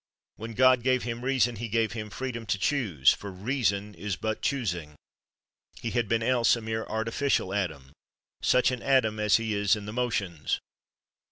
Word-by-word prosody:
When 110 +1 -7
God 130 0 +5
gave 130 0 +1
him 120 0 -4
reason, 125 -3 +1
he 120 +3 -4
gave 110 0 +1
him 110 -2 -5
freedom 115 -1 -5
to 95 - +1
choose, 100 - +2
for 100 - -8
reason 105 -1 -1
is 100 -1 -4
but 110 +3 -3
choosing; 90 - -2 0.8
he 115 - -3
had 120 -2 0
been 115 0 +1
else 120 -1 +3
a 115 - -6
mere 110 0 -3
artificial 110 -1 0
Adam, 75 -9 -3 0.5
such 125 +1 +3
an 125 -2 -4
Adam 120 -6 +2
as 105 -1 +4
he 115 -1 -2
is 100 0 +3
in 105 -1 -7
the 105 - -6
motions. 100 -10 -1
110 Hz, 175 wpm, -28 LUFS, 100-125 Hz, 0.8 s, God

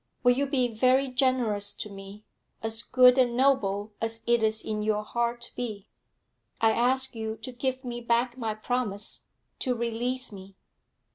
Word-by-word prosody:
'Will 245 - +6
you 280 +2 +1
be 260 -3 +1
very 255 +4 +2
generous 250 -6 +1
to - - -5
me 200 +1 -11 0.4
as 225 +1 -2
good 250 +1 +5
and 240 -2 +2
noble 215 -6 +2
as 225 0 -1
it 235 -1 +3
is 220 0 +1
in 215 -1 -2
your 210 0 0
heart 235 +2 -1
to 235 - -8
be? 215 -4 -5 0.7
I 225 0 +4
ask 260 +3 +2
you 220 -1 -4
to 255 - -5
give 260 +1 -3
me 240 -1 -4
back 235 +1 +1
my 225 -4 -3
promise 215 -2 -3 0.3
to 255 -2 0
release 240 +2 -2
me. 195 -1 -11
235 Hz, 165 wpm, -28 LUFS, 215-255 Hz, 0.7 s, Will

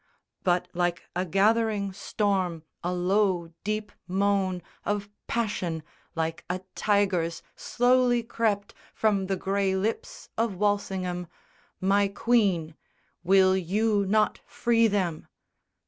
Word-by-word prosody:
But 180 0 +2
like 175 0 0
a 180 +1 0
gathering 205 +1 +2
storm 190 -4 -1 0.2
a 175 - -1
low 180 -1 +1
deep 210 0 -2 0.2
moan 190 -1 +1 0.2
Of 205 0 -2 0.2
passion, 185 -8 -1 0.3
like 160 0 -2
a 180 +1 -2
tiger's, 185 -5 +1
slowly 245 -1 +2
crept 220 -3 -1 0.2
From 200 -3 +1
the 195 - 0
grey 195 0 0
lips 210 +4 -3
of 225 -4 +1
Walsingham. 185 -3 -1 0.5
"My 200 +2 +3
Queen, 195 -7 +1 0.5
Will 190 +1 +5
you 200 +3 +1
not 215 +2 +2
free 230 -1 +3
them?" 185 -6 -1
195 Hz, 110 wpm, -27 LUFS, 180-210 Hz, 0.5 s, Will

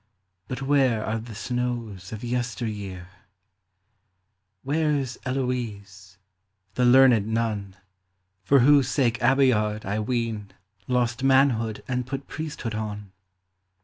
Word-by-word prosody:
But 130 +1 -5
where 135 -5 +2
are 110 +1 -1
the 110 -1 -9
snows 120 -5 -4
of 110 +2 -7
yester 120 0 -2
year? 95 -4 -6 1.5
Where 150 +1 +1
's 120 -1 -9
Heloise, 105 -8 -4 0.6
the 125 +4 +1
learned 120 -4 +6
nun, 110 -4 -2 0.7
For 135 +7 +4
whose 140 0 +5
sake 125 -3 +1
Abeillard, 110 -6 +2
I 100 +3 -1
ween, 110 -3 -2 0.3
Lost 125 0 0
manhood 130 -5 +2
and 125 -1 -2
put 135 +1 -5
priesthood 150 -7 -5
on 105 -2 -5
120 Hz, 115 wpm, -25 LUFS, 105-130 Hz, 1.5 s, learned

